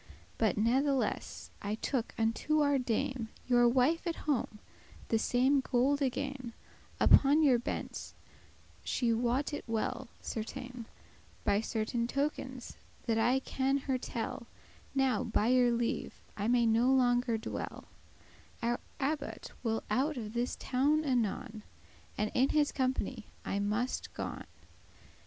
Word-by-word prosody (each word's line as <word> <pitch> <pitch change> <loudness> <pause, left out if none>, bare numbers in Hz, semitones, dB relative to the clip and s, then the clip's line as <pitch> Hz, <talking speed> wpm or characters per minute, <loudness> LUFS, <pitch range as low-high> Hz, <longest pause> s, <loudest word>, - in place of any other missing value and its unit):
But 215 -4 +2
natheless 265 +5 0
I 205 +1 -2
took 240 +1 -2
unto 230 +7 +1
our 285 -1 +3
Dame, 245 -1 -1 0.2
Your 240 -1 +5
wife 265 +8 +2
at 335 - 0
home, 265 -7 0 0.5
the 225 - +2
same 260 +5 +3
gold 265 +2 +1
again, 270 -2 -2 0.5
Upon 290 +3 +6
your 260 -5 +5
bench; 240 - -5 0.7
she 235 -2 +1
wot 245 +6 0
it 290 - -3
well, 225 +3 -2
certain, 235 +1 -6 0.6
By 200 +1 +2
certain 225 +1 -1
tokens 260 -2 -3 0.3
that 225 -2 +1
I 255 +4 +3
can 270 +1 0
her 265 -2 -1
tell 235 -1 -4 0.5
Now, 265 -2 +2
by 225 -1 +1
your 250 -1 +5
leave, 235 0 -2 0.2
I 205 +1 -2
may 240 0 +4
no 230 +3 +4
longer 245 -2 +3
dwell; 220 - -5 0.8
Our 240 +1 +1 0.2
abbot 285 +1 -3
will 225 -2 -1
out 270 +6 +1
of 215 -2 -5
this 240 +1 -1
town 290 +4 +1
anon, 225 -4 -1 0.6
And 210 0 0
in 260 +2 +3
his 300 -1 +2
company 255 -3 -1 0.2
I 200 - -1
muste 210 +5 -1
gon. - - -5
245 Hz, 130 wpm, -32 LUFS, 230-270 Hz, 0.8 s, Upon